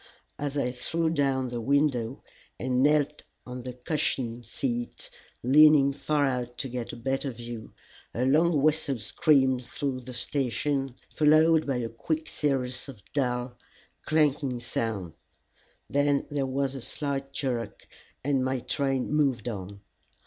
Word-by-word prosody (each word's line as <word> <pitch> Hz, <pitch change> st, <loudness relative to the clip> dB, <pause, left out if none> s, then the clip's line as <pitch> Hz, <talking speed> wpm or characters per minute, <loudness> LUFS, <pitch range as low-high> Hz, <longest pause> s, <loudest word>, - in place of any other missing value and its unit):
As 145 Hz, 0 st, -2 dB
I 125 Hz, -3 st, +1 dB
threw 160 Hz, +6 st, -1 dB
down 135 Hz, -4 st, +1 dB
the 120 Hz, -1 st, -4 dB
window 135 Hz, -2 st, +1 dB, 0.4 s
and 125 Hz, 0 st, +1 dB
knelt 150 Hz, +1 st, +3 dB, 0.2 s
on 125 Hz, 0 st, -6 dB
the 125 Hz, 0 st, -6 dB
cushioned 125 Hz, -3 st, -2 dB
seat, 120 Hz, 0 st, -3 dB, 0.3 s
leaning 140 Hz, +1 st, +7 dB
far 145 Hz, +1 st, +1 dB
out 125 Hz, -2 st, -2 dB
to -, -, -2 dB
get 120 Hz, -1 st, -4 dB
a -, -, -7 dB
better 135 Hz, +3 st, -1 dB
view, 120 Hz, -2 st, -8 dB, 0.4 s
a 125 Hz, +3 st, -1 dB
long 155 Hz, +2 st, +3 dB
whistle 155 Hz, -3 st, +2 dB
screamed 130 Hz, +1 st, +3 dB
through 130 Hz, +1 st, -3 dB
the 125 Hz, 0 st, -9 dB
station, 135 Hz, +1 st, -1 dB, 0.2 s
followed 155 Hz, +1 st, +5 dB
by 135 Hz, -3 st, +1 dB
a 120 Hz, -2 st, -1 dB
quick 155 Hz, +8 st, -3 dB
series 130 Hz, -2 st, -1 dB
of 115 Hz, -8 st, -11 dB
dull, 125 Hz, -3 st, -1 dB, 0.5 s
clanking 145 Hz, -5 st, +1 dB
sounds; 110 Hz, -7 st, -3 dB, 0.7 s
then 145 Hz, 0 st, +2 dB
there 140 Hz, -2 st, 0 dB
was 135 Hz, 0 st, -1 dB
a 135 Hz, -, -6 dB
slight 140 Hz, +1 st, -3 dB
jerk, 120 Hz, -7 st, -3 dB, 0.4 s
and 135 Hz, -1 st, +1 dB
my 130 Hz, 0 st, 0 dB
train 135 Hz, +1 st, -1 dB
moved 135 Hz, -7 st, +2 dB
on. 100 Hz, -3 st, -5 dB
135 Hz, 140 wpm, -28 LUFS, 125-145 Hz, 0.7 s, leaning